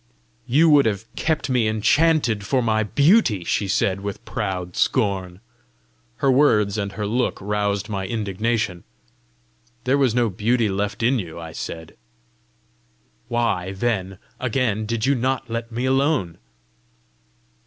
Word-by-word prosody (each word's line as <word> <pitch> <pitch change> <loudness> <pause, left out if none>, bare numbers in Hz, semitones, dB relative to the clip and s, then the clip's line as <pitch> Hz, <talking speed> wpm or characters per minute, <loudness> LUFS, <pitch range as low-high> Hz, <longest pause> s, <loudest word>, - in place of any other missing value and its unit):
"You 155 +6 +4
would 145 -4 +5
have 105 0 -2
kept 160 -1 -1
me 125 -4 +1
enchanted 115 +1 +2
for 125 +6 0
my 110 -1 +1
beauty!" 140 - +3
she 100 - -1
said, 95 0 0
with 100 -1 -6
proud 90 -2 -4
scorn. 95 -6 0 0.7
Her 140 -2 +2
words 105 -7 +3
and 100 -1 -3
her 105 +1 -3
look 120 +5 0
roused 100 0 -1
my 100 -3 -3
indignation. 105 -2 -2 1.0
"There 130 +3 +2
was 130 -5 +2
no 120 -1 +3
beauty 115 +3 +1
left 100 +2 -2
in 125 +2 +3
you," 85 -4 -7
I 80 -1 -8
said. 80 0 -7 1.3
"Why, 100 -6 -1
then, 95 -3 -2 0.2
again, 115 -4 -1
did 115 0 -1
you 140 - +3
not 130 -1 -1
let 115 0 -4
me 120 +3 -2
alone?" 135 - +1
110 Hz, 135 wpm, -22 LUFS, 100-125 Hz, 1.3 s, would